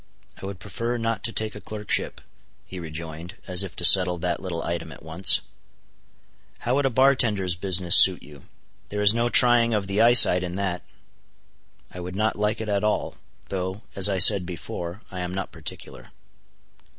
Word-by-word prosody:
"I 95 - -8
would 100 -1 -9
prefer 115 +5 -6
not 115 -1 -4
to 115 - -2
take 110 -1 -3
a 105 - -12
clerkship," 105 -1 -5 0.4
he 95 - -11
rejoined, 80 +2 -10
as 90 0 0
if 95 -3 -10
to - - 0
settle 90 -2 +7
that 85 0 -4
little 90 -3 -6
item 85 -1 -6
at - - -15
once. 85 +1 +3 1.2
"How 120 - -4
would 140 0 0
a - - -1
bar 130 +3 +2
tender's 105 -8 -2
business 90 0 +2
suit 95 -2 +5
you? 75 -3 -17 0.4
There 105 0 -4
is 105 +1 +4
no 120 +1 -2
trying 120 -2 +3
of 100 -2 -3
the 100 +2 -2
eyesight 115 -6 +6
in 90 0 -7
that." 95 -2 -4 1.1
"I 90 - -11
would 90 +1 -9
not 110 +2 -2
like 105 +1 -3
it 110 - -7
at 100 -1 -3
all; 105 0 -3 0.3
though, 95 +2 -6
as 100 +1 +2
I 95 - -2
said 95 +1 +7
before, 85 +2 -9
I 90 - -8
am 90 +1 -6
not 95 - -6
particular." 80 -3 -10
95 Hz, 185 wpm, -22 LUFS, 90-110 Hz, 1.2 s, settle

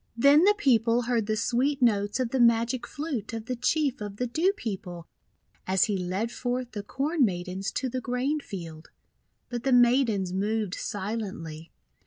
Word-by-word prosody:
Then 285 +7 +6
the 415 +1 +5
people 235 - +3
heard 235 -3 0
the 215 - +1
sweet 255 +6 0
notes 205 -3 +2
of 250 -3 -1
the 265 - 0
magic 235 +1 +3
flute 280 -9 -4
of 225 -1 -5
the 250 +1 -3
Chief 275 0 0
of 205 -1 -5
the 250 - -1
Dew 320 +10 +2
People 185 - -6 0.6
as 190 -1 +3
he 210 - +1
led 190 +5 -2
forth 245 0 -3
the 210 - -5
Corn 280 +8 0
Maidens 190 0 -2
to 265 - -1
the 255 +1 -3
grain 255 +5 -1
field. 170 - -8 0.6
But 240 -1 -3
the 270 - +1
Maidens 240 -6 +3
moved 210 0 -1
silently. 190 -8 -5
230 Hz, 170 wpm, -27 LUFS, 200-255 Hz, 0.6 s, Then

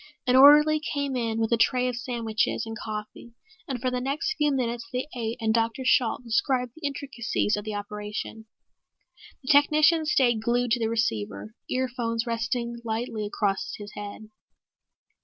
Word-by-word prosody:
An 250 -1 +3
orderly 300 +3 +7
came 285 -3 -3
in 230 -2 -1
with 225 0 0
a 235 - +4
tray 250 +2 +2
of 250 - -2
sandwiches 235 -3 -1
and 225 0 -6
coffee 215 +2 -7 0.3
and 260 -3 -3
for 255 +1 -1
the 250 0 -2
next 280 +11 -1
few 300 -6 +1
minutes 240 -3 -2
they 255 +3 -2
ate 230 -1 -3
and 220 -1 +1
Dr. 230 +3 0
Shalt 250 -1 +2
described 250 +1 0
the 320 -2 -3
intricacies 260 -6 -2
of 210 0 -5
the 215 -1 -4
operation. 210 +2 -6 1.0
The 260 - +1
technician 305 +2 +4
stayed 240 -6 +3
glued 240 +1 0
to 240 - +3
the 225 -1 0
receiver, 105 - -2 0.2
earphones 245 -2 -1
resting 235 0 -2
lightly 220 -1 -3
across 200 -1 -1
his 205 0 -9
head. 205 +1 -8
235 Hz, 160 wpm, -26 LUFS, 220-260 Hz, 1.0 s, orderly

